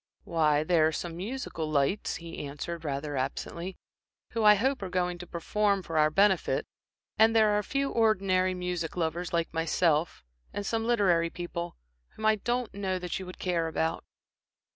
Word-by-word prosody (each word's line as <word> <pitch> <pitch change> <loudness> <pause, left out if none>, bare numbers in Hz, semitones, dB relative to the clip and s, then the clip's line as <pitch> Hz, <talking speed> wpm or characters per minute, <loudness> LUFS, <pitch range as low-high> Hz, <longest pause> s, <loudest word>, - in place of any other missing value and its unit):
"Why, 155 -3 +2
there 160 -1 +4
are - - 0
some 165 +2 -4
musical 185 - -4
lights," 150 +7 +1
he 170 -2 -7
answered, 150 +4 -5
rather 145 0 -3
absently 170 +7 -4 0.5
"who, 225 -1 -1
I 210 0 +8
hope, 260 +5 0
are 190 - -4
going 180 -1 -1
to 180 - -8
perform 200 +4 0
for 165 -2 -1
our 155 0 +5
benefit, 195 +3 +2 0.5
and 225 +1 +6
there 220 -1 +6
are 210 - +3
a - - -3
few 275 +1 -1
ordinary 190 -5 +2
music 180 -2 -3
lovers 170 +1 -1
like 170 -1 -1
myself, 165 - +1 0.3
and 205 - -3
some 225 +2 -1
literary 180 -8 +3
people 175 0 -5 0.4
whom 215 - -5
I 215 0 +4
don't 240 +2 -2
know 190 -2 -2
that 180 0 -4
you 190 - -7
would 180 - -9
care 170 -3 0
about." 160 0 -1
180 Hz, 175 wpm, -29 LUFS, 165-205 Hz, 0.5 s, I